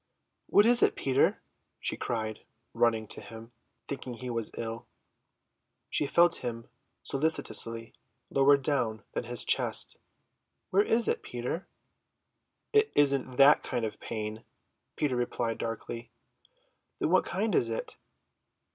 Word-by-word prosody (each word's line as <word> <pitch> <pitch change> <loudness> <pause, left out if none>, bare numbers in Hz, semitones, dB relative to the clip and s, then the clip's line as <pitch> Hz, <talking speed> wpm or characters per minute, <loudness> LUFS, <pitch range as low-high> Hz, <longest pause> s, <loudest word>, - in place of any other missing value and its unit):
"What 205 - +5
is 240 +1 +6
it, - - +4
Peter?" 135 0 +1 0.4
she - - -2
cried, 110 -2 -3 0.3
running 115 -2 +2
to - - -4
him, 115 +1 -11 0.4
thinking 130 -3 -5
he 125 +1 -6
was 115 -2 -1
ill. 115 0 -5 1.0
She 145 - +2
felt 170 +4 +4
him 115 -2 -5 0.4
solicitously, 115 -6 +1 0.4
lower 140 +1 +5
down 130 -6 -1
than - - -3
his 120 0 -3
chest. - - +2 0.7
"Where 195 - +5
is 225 +2 +2
it, - - 0
Peter?" 125 +9 -5 1.1
"It 430 0 +4
isn't 140 -3 +2
that 140 +3 +7
kind 120 -3 -2
of 110 - -6
pain," 110 0 -5 0.5
Peter 145 -4 0
replied 120 -2 -2
darkly. 115 +1 -5 0.9
"Then - - -1
what 185 - +5
kind 210 +2 -1
is 115 - +2
it?" 115 - -5
125 Hz, 130 wpm, -29 LUFS, 115-145 Hz, 1.1 s, that